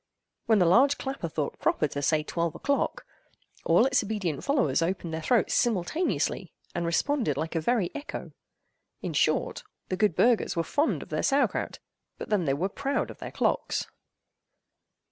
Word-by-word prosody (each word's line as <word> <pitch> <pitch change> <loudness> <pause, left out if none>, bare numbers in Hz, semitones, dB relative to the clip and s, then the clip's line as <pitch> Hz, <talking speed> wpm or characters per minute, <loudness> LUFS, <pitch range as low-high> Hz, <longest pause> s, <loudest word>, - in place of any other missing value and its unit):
When 220 -2 +5
the 180 - +4
large 265 +11 +5
clapper 265 -11 -4
thought 150 -1 -3
proper 150 - +1
to 145 - -4
say 155 +2 +2
"Twelve 170 0 -2
o'clock!" 285 - -1 0.6
all - - +4
its 270 0 +3
obedient 195 -8 -3
followers 280 - +2
opened 170 -1 -2
their 160 - -3
throats 235 +7 +2
simultaneously, 240 - 0 0.2
and 170 -1 -2
responded 200 - +1
like 160 +2 -3
a 165 - 0
very 210 0 +1
echo. 295 0 -6 0.7
In - - -3
short, - - +1 0.3
the 185 - -1
good 210 -5 +2
burghers 235 -4 +3
were 165 - +1
fond 290 - 0
of - - -16
their - - -1
sauer 280 0 +3
kraut, - - -4 0.4
but - - -7
then 200 -5 +2
they 135 - +2
were 175 +7 0
proud 275 +7 -2
of - - -14
their - - -6
clocks. - - 0
195 Hz, 170 wpm, -27 LUFS, 165-270 Hz, 0.7 s, When